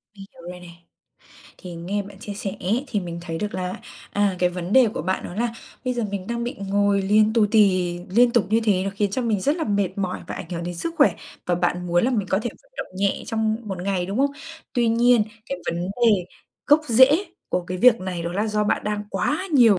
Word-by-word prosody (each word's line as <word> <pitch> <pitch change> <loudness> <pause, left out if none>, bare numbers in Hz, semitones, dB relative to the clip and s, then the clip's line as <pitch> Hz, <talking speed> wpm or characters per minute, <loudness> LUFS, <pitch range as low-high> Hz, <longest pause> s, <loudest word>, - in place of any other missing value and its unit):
Hiểu 195 -1 -10 0.3
rồi 180 - -10
nè. 180 - -12 0.9
Thì 180 -3 -8
nghe 190 +5 -3
bạn 200 -1 -12
chia 205 -1 -7
sẻ 195 -1 -4
ấy, 225 +9 0
thì 210 - -1
mình 170 -2 -6
thấy 165 -2 -4
được 210 +3 -3
là, 185 0 -3 0.4
à, 200 -2 +1
cái 180 0 +3
vấn 180 +1 -5
đề 260 -2 +6
của - - -3
bạn 185 +3 -1
đó - - -7
là 235 +3 -1 0.3
bây 255 0 0
giờ 240 - -1
mình 195 -2 -4
đang 235 +1 -2
bị 240 - -3
ngồi 200 0 +2
liền 210 +2 +4
tù 220 -2 +4
tì 185 -5 +3
liên 235 +5 +5
tục 235 -4 +3
như 225 +1 +4
thế, 195 -4 +2
nó 195 - -1
khiến 205 0 0
cho 255 +6 -1
mình 220 -4 0
rất 285 - +1
là 320 - -2
mệt 200 -3 +1
mỏi 185 -2 -2
và - - -5
ảnh 170 - -7
hưởng 170 -1 -4
đến 175 0 -4
sức 335 - -4
khỏe, - - +6 0.3
và 180 - +2
bạn 180 0 -1
muốn 175 +2 +2
là 255 - +2
mình 210 -7 -1
có 190 - +3
thể 240 - -2
vận - - -30
động - - -6
nhẹ 195 0 0
trong 220 -1 0
1 190 - -4
ngày, 185 -2 -1
đúng 200 +5 -3
không? 280 +1 +3 0.4
Tuy 240 -2 +2
nhiên 235 -1 +4 0.2
cái 275 +2 -4
vấn 170 +1 -1 0.2
đề 210 -6 +4 0.4
gốc 295 +2 +6
rễ 265 - +5 0.2
của 180 - 0
cái 185 +1 -4
việc 240 +2 +6
này 185 -2 -4
đó 170 +1 -3
là 205 +4 0
do 210 -1 0
bạn - - 0
đang 210 0 -2
quá 315 +6 0
nhiều 230 -8 +6
205 Hz, 250 wpm, -23 LUFS, 185-235 Hz, 0.9 s, đề